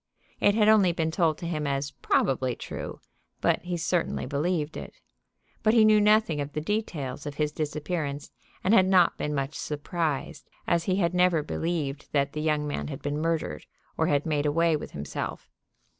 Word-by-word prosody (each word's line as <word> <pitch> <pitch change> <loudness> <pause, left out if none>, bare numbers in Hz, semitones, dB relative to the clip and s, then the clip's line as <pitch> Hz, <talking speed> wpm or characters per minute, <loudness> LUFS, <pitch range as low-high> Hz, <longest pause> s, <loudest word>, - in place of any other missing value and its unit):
It 205 - +4
had 215 -1 +4
only 210 -5 +6
been 160 -1 -1
told 160 -3 +1
to 170 - -5
him 155 -3 -2
as 140 0 -1
probably 130 -2 0
true, - - -7 0.4
but - - +2
he 175 0 -3
certainly 170 +1 -1
believed 155 +1 -1
it. - - -8 0.7
But 215 +1 +3
he 220 -2 +7
knew 215 -1 +6
nothing 210 -7 +3
of 145 0 -5
the - - -1
details 155 -8 -3
of 145 - -5
his 150 0 0
disappearance, 150 -1 -3 0.3
and 195 - +3
had 190 -4 +6
not 185 -3 +4
been 150 0 -2
much 135 +1 -2
surprised, 150 0 -3 0.2
as 170 -1 +1
he 185 - +1
had 175 -3 +1
never 180 -3 +3
believed 150 -3 -3
that 140 -1 +1
the 150 - -3
young 150 -1 0
man 145 - -3
had 145 -1 -7
been 145 +1 -2
murdered 165 0 -2 0.3
or - - +1
had 145 0 +1
made 150 -2 0
away 165 +2 +3
with 150 - -5
himself. 70 0 -6
155 Hz, 185 wpm, -27 LUFS, 145-180 Hz, 0.7 s, he